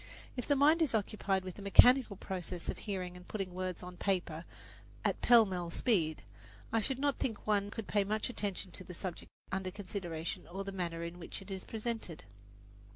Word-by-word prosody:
If 250 - -4
the 285 - +4
mind 300 +4 +5
is 290 -8 +3
occupied 200 -2 0
with 185 -1 -7
the - - -8
mechanical 240 +3 +7
process 180 -2 -5
of - - -2
hearing 185 -3 -3
and 180 0 -12
putting 195 -4 -3
words 185 -1 -3
on 180 0 -8
paper 175 -4 -1 0.6
at - - +1
pell 235 -2 +8
mell 180 -3 -3
speed, 170 -6 +1 0.5
I 225 - +4
should 265 +4 0
not 285 0 +1
think 225 -5 -2
one 205 -1 +2
could 225 +1 -5
pay 205 -1 +2
much 215 +2 0
attention 200 -5 -3
to 185 - -6
the 180 0 -9
subject 180 -1 -6 0.2
under 190 -1 -1
consideration 180 -4 -4
or 190 +3 -4
the 195 - -4
manner 170 -3 -2
in 170 +1 -6
which 170 - -6
it 195 0 -10
is 190 -1 -4
presented. 220 -6 -4
195 Hz, 195 wpm, -34 LUFS, 180-215 Hz, 0.6 s, pell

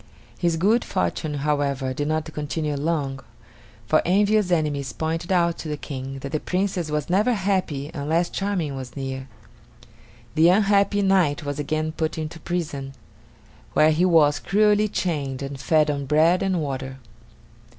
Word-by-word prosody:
His 170 -2 +1
good 210 +8 +3
fortune, 145 - -2
however, 140 -3 0
did 145 +2 -2
not 155 0 -2
continue 150 0 -2
long, 140 -2 -1 0.7
for - - +3
envious 205 +2 +3
enemies 145 -6 0
pointed 165 +3 -3
out 170 -2 +2
to - - -6
the 150 -1 -3
King 135 -2 -6
that 140 - -6
the 155 - 0
Princess 180 -2 -1
was 150 0 -2
never 205 +7 +2
happy 185 -8 -1
unless 160 +3 0
Charming 185 -8 -2
was 130 -2 -7
near. 135 -1 -4 1.1
The 160 +2 +5
unhappy 200 +1 +3
knight 180 -6 +2
was 145 0 -3
again 155 +2 -1
put 160 0 -2
into 160 +1 -5
prison, 150 -6 -4 0.8
where 155 +1 +5
he 160 +3 +2
was 160 -5 +4
cruelly 210 +2 +3
chained 145 -9 -2
and 135 0 -6
fed 155 +1 +3
on 140 -1 -4
bread 160 +5 +4
and 190 -2 0
water. 135 -1 -4
155 Hz, 150 wpm, -24 LUFS, 145-180 Hz, 1.1 s, The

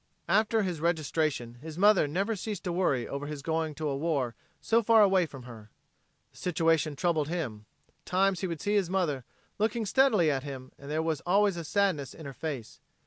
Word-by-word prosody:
After 215 +3 +3
his 175 -5 -3
registration 155 -7 -1
his 160 +1 -8
mother 205 +1 +6
had 145 - 0
never 195 +8 0
ceased 205 -1 -5
to 180 - -2
worry 140 -9 +1
over 140 +1 -5
his 145 -2 -6
going 160 -1 -1
to 155 0 -3
a 140 - -1
war 140 -5 -1 0.3
so 230 +1 +2
far 225 -1 +6
away 190 -3 +3
from 135 -4 -11
her. 115 -3 -11 0.6
The - - -21
situation 165 -3 +1
troubled 160 -2 +1
him. 125 -11 -4 0.2
At - - -33
times 190 0 +2
he 190 - -2
would 165 -3 -5
see 205 - 0
his 200 -4 +2
mother 160 -9 -1 0.3
looking 220 +1 0
steadily 210 - +4
at 135 -2 -1
him, 130 -2 -8
and 140 - -10
there 155 +2 0
was 160 -4 -1
always 200 +2 +3
a 170 - -5
sadness 160 -4 0
in 160 - -10
her 140 - -6
face. 135 -7 -6
165 Hz, 205 wpm, -29 LUFS, 145-195 Hz, 0.6 s, mother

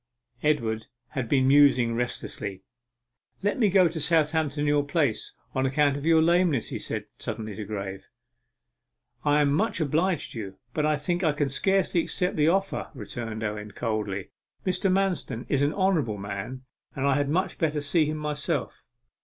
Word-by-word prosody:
Edward 115 -8 0 0.2
had 130 -6 -3
been 130 -2 +3
musing 135 -4 +5
restlessly. 105 -5 -3 0.8
'Let 205 +5 0
me 215 -4 +4
go 185 -1 +5
to 160 -1 -4
Southampton 155 -1 +2
in 150 - +1
your 145 0 +3
place, 140 -6 0 0.2
on 130 0 +1
account 140 +1 +2
of 145 +2 -4
your 160 -1 +5
lameness?' 170 -6 +2
he - - -4
said - - -3
suddenly 110 -1 -4
to 105 +2 -6
Graye. 100 -2 -5 1.2
'I 145 0 +4
am 140 -1 +3
much 210 +4 +1
obliged 160 +3 0
to 115 - -6
you, 95 -3 -7 0.2
but 150 -1 +1
I 155 - +3
think 175 +5 -2
I 155 -3 +3
can 145 -1 0
scarcely 190 +4 +2
accept 180 +2 -1
the 150 -1 +3
offer,' 195 +3 0
returned 110 -1 -5
Owen 105 0 -4
coldly. 105 -4 -3 0.3
'Mr. 185 +1 +1
Manston 185 -11 0
is 140 - +2
an 145 +1 +3
honourable 165 - +1
man, 100 +6 -6 0.3
and 135 - -1
I 140 - +4
had 145 0 0
much 185 +5 0
better 155 -4 +1
see 150 +2 +2
him 155 0 -2
myself. 150 -1 -2
145 Hz, 170 wpm, -26 LUFS, 115-165 Hz, 1.2 s, musing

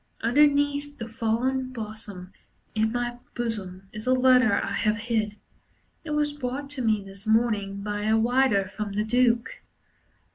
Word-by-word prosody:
Underneath 285 +3 +2
the 230 - -5
fallen 240 +4 -1
blossom 210 -5 -7 0.4
In 220 0 +1
my 240 0 -2 0.2
bosom, 195 -5 -4
Is 215 +2 -7
a 255 - +5
letter 255 -2 +5
I 200 - 0
have 215 0 +1
hid. 215 -2 -1 0.7
It 320 - -8
was 295 -1 +1
brought 280 0 -4
to 280 -3 -4
me 215 -4 +1
this 195 +2 -11
morning 215 -3 +1
by 205 0 -3
a 220 +1 +3
rider 235 -4 +3
from 200 +1 -5
the 210 +1 0
Duke. 240 - +1
230 Hz, 150 wpm, -26 LUFS, 210-255 Hz, 0.7 s, a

